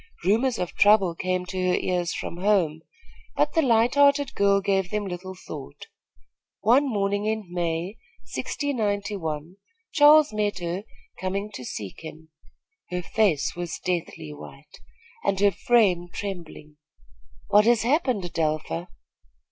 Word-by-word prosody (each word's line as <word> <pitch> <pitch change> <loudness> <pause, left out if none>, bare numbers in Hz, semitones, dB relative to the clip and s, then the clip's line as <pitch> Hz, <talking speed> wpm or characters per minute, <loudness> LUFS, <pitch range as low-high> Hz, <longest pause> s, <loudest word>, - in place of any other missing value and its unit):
Rumors 230 +7 +2
of 180 - -3
trouble 200 -4 +5
came 185 +1 -2
to 185 0 -2
her 180 - +3
ears 175 -2 -1
from 170 - -5
home; 180 -5 +1 0.5
but - - +1
the 325 - +3
light 235 -3 +3
hearted 285 -1 +4
girl 200 0 +3
gave 195 -2 0
them 210 0 -2
little 185 0 -6
thought. 185 - -9 0.8
One 270 +5 +4
morning 205 -1 0
in 220 -1 -1
May, 175 +3 -2 0.4
1691, 200 - -3 0.3
Charles 300 -2 +6
met 210 -2 -1
her 175 +3 -4 0.3
coming 200 +3 -3
to 160 - -8
seek 100 -5 -7
him. 160 0 -10 0.6
Her 180 0 -3
face 180 -8 +1
was 175 -1 -4
deathly 165 -4 -4
white, 145 - -13 0.4
and 195 -1 0
her 200 0 +4
frame 190 -5 +2
trembling. 165 -7 -7 0.7
"What 210 +1 +5
has 235 -1 +4
happened, 255 - +1
Adelpha?" 165 +1 -2
195 Hz, 130 wpm, -25 LUFS, 175-215 Hz, 0.8 s, Charles